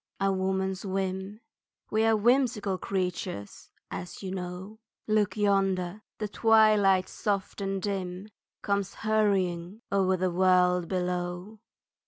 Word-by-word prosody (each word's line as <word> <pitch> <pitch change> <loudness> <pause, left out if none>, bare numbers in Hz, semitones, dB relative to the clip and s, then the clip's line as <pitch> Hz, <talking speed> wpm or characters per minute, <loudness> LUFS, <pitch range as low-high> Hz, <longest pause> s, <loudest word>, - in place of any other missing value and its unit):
A 195 0 +2
woman's 190 0 -1
whim, 190 +2 -3 0.5
We 220 +1 +2
are 225 -1 +4
whimsical 220 -4 +2
creatures, 180 - -4 0.2
as 180 +3 -7
you 190 - -4
know 185 +3 -6 0.3
Look 215 0 +1
yonder, 195 -2 +1 0.2
the 210 - -3
twilight 210 -3 +4
soft 200 -1 -2
and 195 0 -1
dim 190 0 -4 0.3
Comes 200 -1 -1
hurrying 200 -2 +1
over 190 -1 +2
the 185 0 0
world 180 -1 +3
below. 180 +3 -3
195 Hz, 115 wpm, -28 LUFS, 185-210 Hz, 0.5 s, are